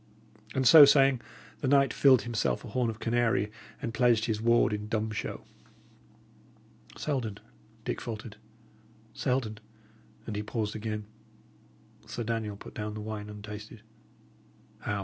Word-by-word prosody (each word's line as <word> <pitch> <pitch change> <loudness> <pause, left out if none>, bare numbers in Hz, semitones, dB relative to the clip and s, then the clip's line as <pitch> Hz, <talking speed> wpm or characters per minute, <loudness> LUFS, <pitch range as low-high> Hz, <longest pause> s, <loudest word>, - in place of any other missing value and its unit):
And 130 -1 +2
so 155 +4 +11
saying, 135 -3 +5 0.4
the 140 - -2
knight 140 0 +4
filled 135 -3 +5
himself 120 +1 -1
a - - -8
horn 120 +2 0
of 110 - -5
canary, 115 -2 +1 0.3
and 115 - -4
pledged 120 -3 +3
his 110 -2 -1
ward 115 -1 +3
in 105 0 -4
dumb 110 -1 -1
show. 105 - -5 1.5
"Selden," 125 -9 -2 0.5
Dick - - -3
faltered 110 -2 -7 0.8
"Selden" 125 -5 -1 0.7
And 110 - -5
he 105 - -1
paused 105 0 -3
again. 105 -1 -4 1.0
Sir 120 - -4
Daniel 110 -2 -3
put - - -11
down 105 0 -4
the - - -5
wine 105 -1 -6
untasted. 105 +1 -9 1.0
"How!" 105 -1 -2
110 Hz, 135 wpm, -29 LUFS, 105-125 Hz, 1.5 s, so